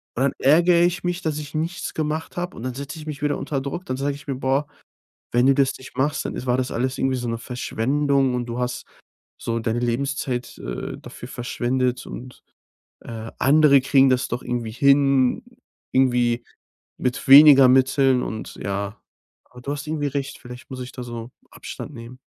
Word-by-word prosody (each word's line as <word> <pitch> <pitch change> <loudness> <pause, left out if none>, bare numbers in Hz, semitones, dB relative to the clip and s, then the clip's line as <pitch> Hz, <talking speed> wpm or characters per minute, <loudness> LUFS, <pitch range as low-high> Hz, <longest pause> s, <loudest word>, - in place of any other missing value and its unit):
und 130 - 0
dann 140 - +1
ärgere 170 +5 +5
ich 175 0 0
mich, 175 +1 -1
dass 155 -3 -2
ich 150 -2 -7
nichts 165 +5 -3
gemacht 155 +1 -3
habe. 175 +1 -4
Und 115 - -8
dann 130 -1 -3
setze 140 +4 -7
ich 150 - -9
mich 150 -2 -6
wieder 145 -1 0
unter 140 -1 -3
Druck. 170 +7 -5
Dann 130 - -3
sage 140 +1 -1
ich 140 0 -14
mir: 135 - -2
„Boah, 135 +3 0 0.6
wenn 120 +2 +3
du 135 - +6
das 135 -2 +3
nicht 130 -1 -13
machst, 145 +3 0
dann - - -4
ist 130 - -5
war 125 0 +1
das 130 0 -1
alles 130 +2 -1
irgendwie 135 0 0
so 120 -1 -3
'ne 115 - -2
Verschwendung 135 +3 0
und 120 -1 -2
du 120 +1 -4
hast 125 0 -3 0.5
so 115 0 -2
deine 115 +1 -1
Lebenszeit, 125 +1 -2
äh, - - -5
dafür 120 - -10
verschwendet 125 0 -2
und, 125 0 -9 0.6
äh, 115 -1 -8
andere 140 0 +5
kriegen 135 0 +4
das 125 -1 +1
doch 120 - -4
irgendwie 120 -2 -3
hin, 140 - +3 0.5
irgendwie 120 -2 +2 0.5
mit 125 +1 -2
weniger 140 -1 +9
Mitteln“ 130 0 +3
und 110 0 -6
ja. 100 +1 -4 0.5
Aber 125 - -13
du 140 - -5
hast 145 +1 -5
irgendwie 150 -1 -2
recht. 140 0 -4
Vielleicht 125 +2 -12
muss 130 - -6
ich 125 0 -7
da 125 - -7
so 120 0 -7 0.2
Abstand - - -8
nehmen. 120 +1 -10
130 Hz, 195 wpm, -23 LUFS, 125-145 Hz, 0.6 s, weniger